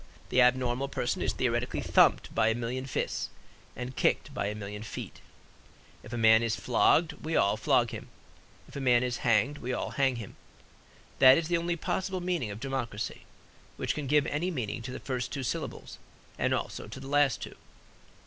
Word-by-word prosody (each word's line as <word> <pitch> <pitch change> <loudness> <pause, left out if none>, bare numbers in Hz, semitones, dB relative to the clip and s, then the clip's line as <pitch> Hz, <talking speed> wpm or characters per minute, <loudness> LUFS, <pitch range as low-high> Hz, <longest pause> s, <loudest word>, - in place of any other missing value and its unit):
The 130 - +4
abnormal 125 +1 +2
person 130 -3 -2
is - - +1
theoretically 120 -1 -1
thumped - - +3
by 110 - +3
a 110 - +2
million 125 +3 -3
fists 130 - -2 0.5
and 125 +1 -6
kicked - - +1
by 100 - -2
a 105 - -3
million 105 0 -6
feet. 110 - -7 0.8
If - - -12
a 120 - -3
man 110 0 +6
is 115 -1 0
flogged 155 +6 +3
we 160 +1 -2
all 100 - +3
flogged - - +2
him; - - -8 0.6
if - - -15
a 140 - -4
man 125 -2 +4
is 125 -1 -1
hanged, 125 +6 +2
we 125 +1 -3
all - - -3
hanged 135 -3 +1
him. 110 -4 -9 0.8
That 130 0 +9
is 165 0 -2
the 170 - +3
only 170 +1 -1
possible 185 +3 -2
meaning 175 -10 -1
of 100 +1 -6
democracy, 120 -5 -4 0.5
which - - -1
can 150 -2 -4
give 150 +1 +3
any 160 +5 -1
meaning 120 - -3
to 125 +2 -6
the 130 - -6
first 125 -2 -3
two 140 - -3
syllables 120 - -5 0.4
and - - 0
also - - -3
to - - -8
the 135 - -9
last 145 -2 +3
two. - - -8
125 Hz, 190 wpm, -29 LUFS, 115-140 Hz, 0.8 s, That